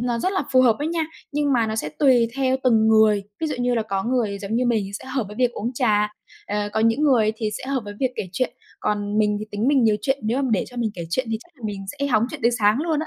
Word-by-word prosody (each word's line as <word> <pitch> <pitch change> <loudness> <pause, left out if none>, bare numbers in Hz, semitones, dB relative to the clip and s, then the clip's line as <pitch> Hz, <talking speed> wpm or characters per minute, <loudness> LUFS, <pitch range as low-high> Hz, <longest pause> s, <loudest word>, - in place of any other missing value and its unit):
nó 240 -1 -1
rất 370 +11 0
là 380 - 0
phù 255 - +6
hợp 230 -3 +4
đó - - -1
nha. 330 0 0 0.3
Nhưng 290 -1 +1
mà 230 -3 +2
nó 220 0 -3
sẽ 150 - -2
tùy 250 -5 +4
theo 265 -1 +2
từng 220 -3 +4
người, 220 -2 +5 0.2
ví 320 - 0
dụ 300 - -2
như 245 0 +1
là 225 - +1
có 195 -3 -2
người 230 -5 0
giống 200 +2 -4
như 250 - +1
mình 220 -4 +1
sẽ - - -13
hợp 260 -3 -2
với 210 - -10
việc 245 -1 +2
uống 235 +4 -3
trà, 210 -4 +2 0.4
ờ, 205 0 -2
có 220 - 0
những 230 +6 +2
người 235 -7 +4
thì 220 -1 -2
sẽ 265 - -6
hợp 265 -2 0
với 205 0 -7
việc 260 -2 +1
kể 185 - -4
chuyện. 250 +7 -1 0.3
Còn 205 0 -1
mình 210 -1 +2
thì 215 - -4
tính 210 +5 0
mình 275 -4 +4
nhiều 215 -1 +4
chuyện, 270 0 +1
nếu 235 +6 0
mà 265 - 0
để 200 - +1
cho 245 - -14
mình 230 -2 0
kể 170 - -5
chuyện 255 +7 0
thì 220 - -1
chắc 345 - -18
là 245 - -19
mình 195 -2 -5
sẽ 280 - 0
hóng 220 -5 +2
chuyện 310 - -7
đến 235 +1 +3
sáng 210 +2 +3
luôn 320 -3 0
á. 315 - -4
230 Hz, 305 wpm, -23 LUFS, 210-260 Hz, 0.4 s, phù